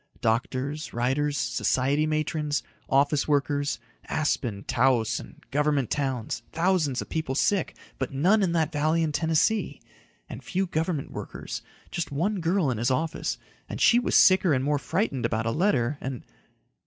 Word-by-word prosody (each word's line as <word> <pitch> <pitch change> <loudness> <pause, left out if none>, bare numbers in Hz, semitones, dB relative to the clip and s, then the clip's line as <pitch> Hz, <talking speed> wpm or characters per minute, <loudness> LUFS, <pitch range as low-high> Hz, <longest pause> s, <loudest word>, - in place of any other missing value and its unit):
Doctors, 130 +6 -1
writers, 140 +5 0
society 130 +6 +1
matrons, 155 -1 -1 0.3
office 140 +2 +2
workers 145 -1 +1 0.3
Aspen, 120 -9 -1
Taos 115 -3 +2
and - - -12
college 145 -3 +1
towns 135 -6 -2
thousands 165 -6 +1
of - - -18
people 155 -5 -2
sick 190 +4 +1 0.2
but - - -2
none 180 +11 +3
in 185 -3 +2
that 160 -2 +1
valley 155 +3 +1
in 155 - 0
Tennessee 165 +8 +1 0.5
and - - -8
few 190 0 -1
government 160 -3 -2
workers - - -6 0.3
just 170 -4 -3
one 185 +8 0
girl 170 -3 +1
in 115 - -3
his 120 +3 +1
office 155 +5 -1 0.3
and - - -5
she 240 - +6
was 245 - 0
sicker 185 -3 +6
and 130 - 0
more 145 0 +1
frightened 140 - -1
about 110 -1 0
a 115 - +1
letter 145 - +1
and.... 130 -2 -5
145 Hz, 155 wpm, -26 LUFS, 130-165 Hz, 0.5 s, she